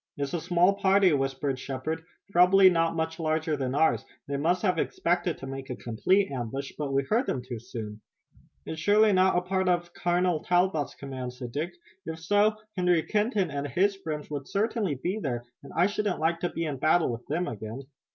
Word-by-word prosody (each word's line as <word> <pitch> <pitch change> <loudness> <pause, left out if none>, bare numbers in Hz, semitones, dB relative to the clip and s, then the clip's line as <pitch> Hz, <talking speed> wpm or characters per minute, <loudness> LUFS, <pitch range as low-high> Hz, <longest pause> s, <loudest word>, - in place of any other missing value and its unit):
"It's 140 -1 -3
a 170 - -1
small 180 +3 +3
party," 195 -2 +4
whispered 135 -1 -1
Shepard, 145 +5 -4 0.3
"probably 185 +1 +7
not 165 -1 +1
much 160 +1 -2
larger 155 -1 0
than 135 -2 -2
ours. 145 -7 +3 0.2
They 140 - -2
must 175 +5 +1
have 180 -5 +2
expected 175 0 0
to - - -8
make 135 0 -7
a 125 - -3
complete 185 - +1
ambush, 135 +2 -4
but 145 -2 -3
we 135 0 +2
heard 230 - +1
them 125 - -2
too 120 -2 -6
soon." 110 -2 -7 0.6
"It's 160 0 -5
surely 210 +3 +5
not 185 -1 +4
a - - +3
part 190 +1 0
of 175 -1 0
Colonel 175 -2 +1
Talbot's 175 -4 +1
command," 130 -3 -6
said 125 -1 -7
Dick. 155 +7 -3 0.3
"If 160 0 -5
so, 205 +5 +3 0.2
Harry 180 -3 +3
Kenton 210 - 0
and 140 0 -3
his 195 +7 +2
friends 155 -6 -5
would 140 -2 -4
certainly 205 - 0
be 180 +11 -2
there 120 - -3 0.2
and 140 - -12
I 175 - +4
shouldn't 205 -2 -1
like 165 +2 +1
to 175 - -1
be 165 - -3
in 145 -3 -3
battle 155 +2 +3
with 120 +1 -7
them 170 +5 -1
again." 110 +3 -6
160 Hz, 200 wpm, -28 LUFS, 135-185 Hz, 0.6 s, probably